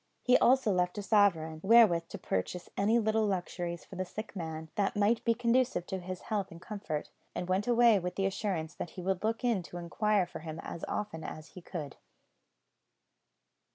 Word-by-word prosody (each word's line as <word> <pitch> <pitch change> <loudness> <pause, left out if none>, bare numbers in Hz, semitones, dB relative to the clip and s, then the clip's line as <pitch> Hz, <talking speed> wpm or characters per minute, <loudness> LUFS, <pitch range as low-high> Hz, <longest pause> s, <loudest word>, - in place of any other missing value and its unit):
He 250 - +5
also 255 -3 +4
left 180 +1 0
a 205 - -3
sovereign, 170 -7 +3
wherewith 195 -6 +6
to - - -7
purchase 95 - -3
any 215 +4 +3
little 220 -1 +2
luxuries 175 -3 -3
for 190 - -10
the 185 - 0
sick 215 +4 -7
man, 160 -3 -5
that 200 -1 0
might 210 +3 +2
be 230 -1 +2
conducive 240 -5 +1
to 190 - -4
his 185 0 -6
health 205 -3 -2
and 165 - -11
comfort, 170 -6 -5 0.2
and 180 - -3
went 190 +4 0
away 235 -3 +5
with 180 0 -4
the 195 - 0
assurance 190 -5 -2
that - - -5
he - - -4
would 190 +1 -1
look 225 +2 -1
in 235 -6 +2
to 175 0 -9
inquire 195 +3 +1
for 175 - -8
him 160 0 -7
as 170 - -7
often 160 -6 -3
as 155 0 -7
he 180 - -11
could. 155 -5 -6
190 Hz, 190 wpm, -31 LUFS, 170-215 Hz, 0.2 s, wherewith